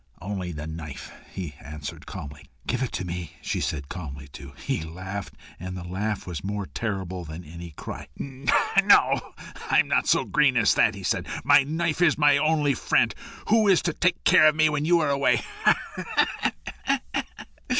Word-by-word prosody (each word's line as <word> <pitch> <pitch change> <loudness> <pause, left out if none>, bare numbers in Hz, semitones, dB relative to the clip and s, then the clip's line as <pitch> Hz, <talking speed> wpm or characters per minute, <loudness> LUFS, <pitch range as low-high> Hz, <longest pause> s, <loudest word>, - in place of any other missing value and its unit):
"Only 95 -2 -4
the 75 -2 -6
knife," 80 -4 -7 0.2
he 90 -6 -6
answered 75 0 -8
calmly. 70 -1 -9 0.2
"Give 125 +1 -1
it 130 - -1
to 95 - -3
me," 85 -2 -5
she - - -3
said, 70 -3 -2
calmly 70 -6 -7
too. 70 0 -11
He - - -2
laughed, 95 +5 -6 0.2
and 90 +1 -6
the 90 - -6
laugh 100 +4 -3
was 85 -5 -5
more 100 0 -3
terrible 95 -4 -4
than 80 +2 -8
any 85 +2 -9
cry. 75 - -8
"No; 135 -1 +3 0.4
I'm - - +4
not - - +1
so - - +4
green - - +3
as - - +4
that," - - +3
he - - -9
said. - - -1 0.2
"My - - +7
knife 160 +3 -1
is 165 -4 +4
my 145 -2 +5
only 150 -2 +2
friend! - - +2 0.4
Who 220 0 +4
is 190 -3 +4
to 170 -1 0
take 180 +2 0
care 155 - +7
of 155 - +4
me 155 0 +4
when 150 0 -1
you 170 +1 +4
are 155 - +1
away? 140 0 +2
95 Hz, 170 wpm, -25 LUFS, -, 0.4 s, My